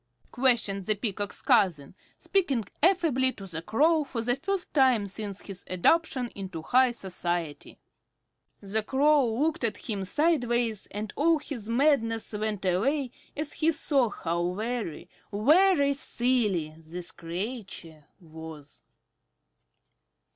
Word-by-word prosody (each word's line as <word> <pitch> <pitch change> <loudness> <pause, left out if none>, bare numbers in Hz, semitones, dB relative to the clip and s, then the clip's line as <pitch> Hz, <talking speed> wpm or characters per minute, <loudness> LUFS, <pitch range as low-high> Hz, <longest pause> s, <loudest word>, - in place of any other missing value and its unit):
questioned 225 -7 +1
the 215 - +3
Peacock's 205 -1 -3
cousin, 165 -9 +2 0.2
speaking 285 - 0 0.2
affably 315 -7 +3
to 195 - -10
the 165 -4 -4
Crow, 300 - +2
for 240 -5 -4
the 245 +1 +2
first 390 +6 -3
time 255 -8 +4
since 200 0 -6
his 195 -1 -8
adoption 255 - +1
into 190 -5 -7
high 255 +7 +4
society. 175 -7 -4 0.8
The 205 +2 0
Crow 280 +3 +3
looked 300 +6 0
at 230 - +1
him 205 -4 -4
sideways, 240 - +1
and 210 +1 -6
all 320 +3 +3
his 245 -7 -7
madness 230 -4 +1
went 210 -2 -2
away 250 +9 +1 0.3
as 300 0 -3
he 320 +1 +2
saw 280 -6 +1
how 175 -1 -2
very, 220 -5 -4 0.2
very 285 - +4
silly 235 - 0
this 170 +2 -5
creature 170 - -7
was. 160 -3 -11
225 Hz, 120 wpm, -28 LUFS, 190-275 Hz, 0.8 s, time